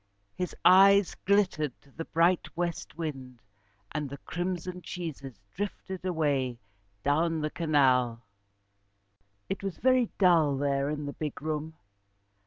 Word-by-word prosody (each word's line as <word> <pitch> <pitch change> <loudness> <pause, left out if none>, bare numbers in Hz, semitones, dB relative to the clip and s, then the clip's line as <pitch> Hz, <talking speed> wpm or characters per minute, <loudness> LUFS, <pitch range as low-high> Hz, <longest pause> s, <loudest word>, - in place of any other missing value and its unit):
His 180 -1 -4
eyes 195 +1 +7
glittered 185 -9 +1
to 140 - -22
the 165 +4 -6
bright 170 +2 +2
West 170 -3 -3
wind, 135 -7 -6 0.5
and 150 -2 -3
the 140 - -7
crimson 180 +2 -4
cheeses 140 - -7 0.2
drifted 190 -2 -5
away 145 -8 0 0.5
down 160 +3 +1
the 150 0 -2
canal. 130 -7 +2 1.2
It 195 - -3
was 195 -4 -4
very 255 -2 +3
dull 165 -7 +4
there 140 0 0
in 150 -1 -3
the 145 - -5
big 150 -2 -5
room. 155 +1 -4
160 Hz, 125 wpm, -29 LUFS, 140-180 Hz, 1.2 s, eyes